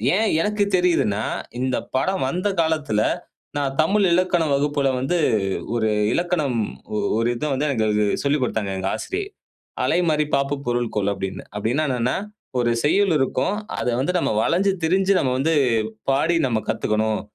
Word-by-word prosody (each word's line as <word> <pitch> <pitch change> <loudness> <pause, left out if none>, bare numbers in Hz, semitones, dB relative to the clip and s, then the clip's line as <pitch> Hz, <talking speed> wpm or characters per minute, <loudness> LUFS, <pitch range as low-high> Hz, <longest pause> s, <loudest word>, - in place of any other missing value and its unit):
ஏன் 220 +1 +2
எனக்கு 210 +1 +1
தெரியுதுன்னா 165 - +2 0.4
இந்த 130 0 0 0.2
படம் 190 +3 +1
வந்த 180 +8 -1
காலத்துல 150 -10 0 0.6
நான் 135 -1 -1
தமிழ் 200 +5 +2
இலக்கண 175 -1 +2
வகுப்புல 140 -1 +1
வந்து 150 +7 0 0.6
ஒரு 110 -2 +1 0.2
இலக்கணம் 165 -8 0 0.6
ஒரு 115 +1 +1
இத 150 +5 -3
வந்து 145 +3 0
எங்களுக்கு 105 -1 +1 0.2
சொல்லிக் 140 -1 +1
கொடுத்தாங்க 105 -5 -2
எங்க 95 +1 -2
ஆசிரியை. 390 +1 -4 0.6
அலைமாறி 155 -4 +2
பாப்பு 140 +1 0
பொருள் 120 -1 -1
கொள் 100 -1 +1
அப்படின்னு, 95 -1 -5
அப்படின்னா 120 +9 0
என்னன்னா 125 0 0 0.4
ஒரு 120 -1 +2
செய்யுள் 195 +4 +3
இருக்கும். 135 +9 0 0.2
அத - - -2
வந்து 160 +7 0
நாம - - 0
வளஞ்சு 195 +4 +2
திரிஞ்சு 190 +4 +2
நாம 130 -2 +1
வந்து 160 +5 +1 0.6
பாடி 160 +5 +2
நம்ம 115 -3 0
கத்துக்கணும். 110 0 0
140 Hz, 145 wpm, -22 LUFS, 120-175 Hz, 0.6 s, செய்யுள்